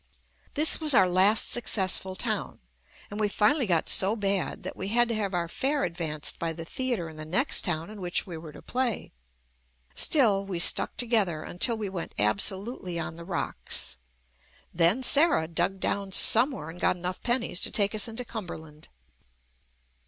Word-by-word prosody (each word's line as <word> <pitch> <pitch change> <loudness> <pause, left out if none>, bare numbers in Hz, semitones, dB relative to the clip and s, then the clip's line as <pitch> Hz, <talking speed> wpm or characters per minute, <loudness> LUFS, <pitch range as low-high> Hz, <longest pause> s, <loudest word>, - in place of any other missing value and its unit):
This 310 +2 +5
was 305 -4 +5
our 190 - +6
last 190 +4 +4
successful 190 -5 0
town, - - -3 0.5
and 205 - -6
we 210 - +1
finally 220 +6 +2
got 170 -4 +1
so 195 +3 +1
bad 200 -3 -2
that - - -7
we 190 - -5
had 240 +3 +3
to - - 0
have 200 -4 -2
our 170 -1 -1
fare 275 - -2
advanced 165 -4 -4
by 165 -1 -2
the 165 0 -8
theatre 240 -4 -3
in 160 -1 -12
the 155 - -6
next 190 - +2
town 170 +1 -3
in 210 -2 -10
which 175 -1 0
we 175 - -8
were 160 -1 -9
to - - -14
play. 250 -3 -2 0.8
Still 215 -10 +2
we 195 -3 -5
stuck 170 - +3
to 245 - -1
gether 195 -10 +1
until 225 +6 0
we 215 -2 -4
went 185 -3 -7
absolutely 190 - -1
on 165 - -5
the 170 - -10
rocks; 175 - -2 0.8
then 175 +9 +2
Sarah 285 - +5
dug 175 +4 -2
down 195 0 -3
somewhere 225 - +4
and 175 - -13
got - - +2
enough 180 +1 -6
pennies 240 -6 -1
to - - +1
take 200 -1 0
us 215 0 0
into 230 +2 -7
Cumberland. 160 -9 -9
195 Hz, 175 wpm, -27 LUFS, 170-230 Hz, 0.8 s, our